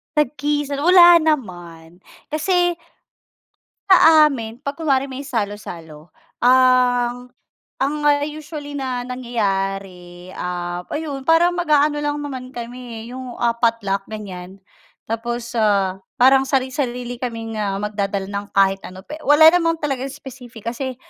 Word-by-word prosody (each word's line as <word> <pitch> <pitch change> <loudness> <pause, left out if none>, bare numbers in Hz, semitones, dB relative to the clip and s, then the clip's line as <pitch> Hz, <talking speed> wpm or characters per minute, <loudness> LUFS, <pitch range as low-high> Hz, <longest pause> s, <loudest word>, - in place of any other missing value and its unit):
Tagisan? 290 0 -1
Wala 345 +1 +7
naman. 175 - -3 0.3
Kasi, 350 +3 +1 1.2
sa 320 -4 +7
amin, 225 -3 -6
pag 280 +3 -5
kunwari 275 -4 +1
may 260 - -6
salo-salo, 175 - -6 0.2
ang 250 -1 +3 0.5
ang 275 +3 0
ah, 290 0 +3
usually 300 -1 -8
na 260 -3 -3
nangyayari, 195 -7 -4
ah, 175 0 -4
ayun 295 -3 -4
parang 335 +2 +4
mag-aano 300 -4 +2
lang 295 0 -1
naman 260 -3 -6
kami 240 -1 -7
eh, 235 - -10
yung, 255 -1 -7
ah, 235 -1 +1
potluck 230 -4 -1
ganyan. 190 -3 -8 0.5
Tapos, 235 +1 -4
ah, 195 -3 +1 0.2
parang 265 +1 +5
sari-sarili 250 -2 -2
kaming 230 -2 -5 0.3
magdadala 200 -1 -2
ng 200 0 -5
kahit 195 0 +3
ano 185 +1 -11
pe 305 +1 -9
wala 295 +2 +6
naman 330 -2 +2
talagang 270 -2 -2
specific 255 -5 -12
kasi, 260 +1 -5
245 Hz, 120 wpm, -20 LUFS, 205-290 Hz, 1.2 s, Wala